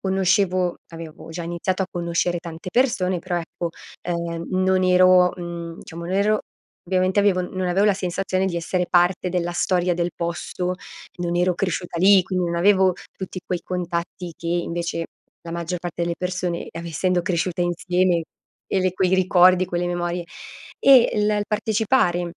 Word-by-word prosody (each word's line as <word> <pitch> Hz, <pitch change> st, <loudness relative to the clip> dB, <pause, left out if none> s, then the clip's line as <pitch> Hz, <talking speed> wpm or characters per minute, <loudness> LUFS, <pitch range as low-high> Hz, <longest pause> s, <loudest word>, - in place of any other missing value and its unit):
conoscevo 185 Hz, -1 st, +1 dB
avevo 165 Hz, -2 st, -10 dB
già 170 Hz, +1 st, -5 dB
iniziato 175 Hz, +3 st, -2 dB
a -, -, -2 dB
conoscere 175 Hz, 0 st, -1 dB
tante 170 Hz, +1 st, -8 dB
persone, 190 Hz, -8 st, +1 dB
però 180 Hz, 0 st, -3 dB
ecco, 170 Hz, 0 st, -5 dB, 0.3 s
ehm, 170 Hz, -1 st, -3 dB
non 185 Hz, 0 st, +2 dB
ero 185 Hz, 0 st, +5 dB
mhmm, 170 Hz, -1 st, -6 dB
diciamo 170 Hz, +1 st, -8 dB
non 185 Hz, -, -2 dB
ero 210 Hz, +2 st, +2 dB, 0.5 s
ovviamente 185 Hz, +2 st, +2 dB
avevo 195 Hz, -3 st, +2 dB
non 185 Hz, 0 st, -3 dB
avevo 190 Hz, +3 st, +2 dB
la 205 Hz, -, +4 dB
sensazione 185 Hz, 0 st, -1 dB
di 180 Hz, -2 st, -2 dB
essere 180 Hz, +1 st, -1 dB
parte 180 Hz, +1 st, +3 dB
della 175 Hz, -1 st, -1 dB
storia 180 Hz, 0 st, +1 dB
del 175 Hz, 0 st, -1 dB
posto, 175 Hz, +2 st, -3 dB, 0.5 s
non 175 Hz, 0 st, -1 dB
ero 180 Hz, +1 st, +2 dB
cresciuta 175 Hz, -1 st, -3 dB
lì, 195 Hz, +2 st, +7 dB
qui 185 Hz, -, -5 dB
non 175 Hz, -2 st, 0 dB
avevo 190 Hz, +1 st, +4 dB, 0.2 s
tutti 185 Hz, -1 st, -6 dB
quei 180 Hz, -1 st, -2 dB
contatti 175 Hz, -1 st, -4 dB
che 170 Hz, -, -6 dB
invece 170 Hz, -1 st, -2 dB, 0.4 s
la 165 Hz, -, -6 dB
maggior 170 Hz, +1 st, -3 dB
parte 175 Hz, 0 st, -4 dB
delle 170 Hz, 0 st, -1 dB
persone, 180 Hz, -1 st, -2 dB
av 165 Hz, -, -7 dB
essendo 175 Hz, +2 st, 0 dB
cresciuta 175 Hz, 0 st, -1 dB
insieme, 175 Hz, 0 st, +1 dB, 0.4 s
e -, -, 0 dB
l -, -, -1 dB
e 185 Hz, -, +2 dB
quei 185 Hz, -1 st, +1 dB
ricordi, 185 Hz, -1 st, +5 dB
quelle 175 Hz, 0 st, -2 dB
memorie. 175 Hz, 0 st, -2 dB, 0.6 s
E 265 Hz, -3 st, +7 dB
l 210 Hz, 0 st, +2 dB
il 210 Hz, -1 st, +1 dB
partecipare 215 Hz, -3 st, +1 dB
180 Hz, 165 wpm, -22 LUFS, 170-185 Hz, 0.6 s, lì